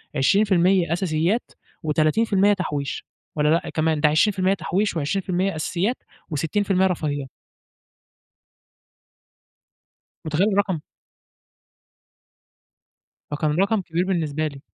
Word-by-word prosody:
20% 185 +2 +3
أساسيات 175 +5 0 0.3
و30% 190 +7 +2
تحويش، 145 -8 -3 0.3
والّا 150 -1 +2
لأ 165 +2 +1
كمان، 155 -1 +1
ده 150 - +5
20% 190 +4 +2
تحويش، 200 +1 -1
و20% 185 +4 -1
أساسيات، 180 +9 -1 0.3
و60% 185 +5 +1
رفاهيات. 145 -6 -3 3.0
مُتخيلة 170 +7 +1
الرقم؟! 195 -4 0 2.5
فكان 150 +1 -1
رقم 200 +2 +2
كبير 170 0 -1
بالنسبة 155 -5 -1
لي. 140 -2 -7
175 Hz, 85 wpm, -23 LUFS, 155-195 Hz, 3.0 s, ده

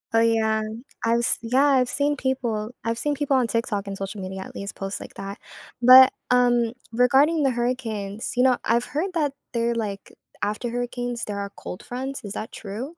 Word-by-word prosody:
Oh - - +6
yeah. 220 -1 +2 0.4
I've 230 +1 +2
s 240 - +3
yeah, 255 +5 +2
I've 260 -3 +3
seen 290 +2 +1
people. 240 -5 -2
I've 230 +1 -1
seen 295 -1 0
people 280 -1 0
on 250 -3 +2
TikTok, 210 -2 -1
and 195 0 -5
social 195 +1 -5
media 190 +1 -6
at - - -12
least 200 0 -5
posts 195 0 -3
like - - -10
that, 195 +1 -7 0.4
but, 255 +1 +9 0.2
um, 240 -2 +3 0.2
regarding 270 +7 +4
the 270 - +3
hurricanes, 230 -4 -2
you 250 - +4
know, 255 -1 +4
I've 235 +2 +2
heard 355 +6 -2
that 295 -4 +1 0.2
they're 235 0 +1
like 205 -3 -4 0.3
after 210 +4 -1
hurricanes 245 0 -3
there 205 -1 -4
are 200 0 -4
cold 180 - -8
fronts, 265 +1 -5
is 200 - -5
that 220 - -5
true? 225 +8 -6
235 Hz, 195 wpm, -24 LUFS, 215-260 Hz, 0.4 s, but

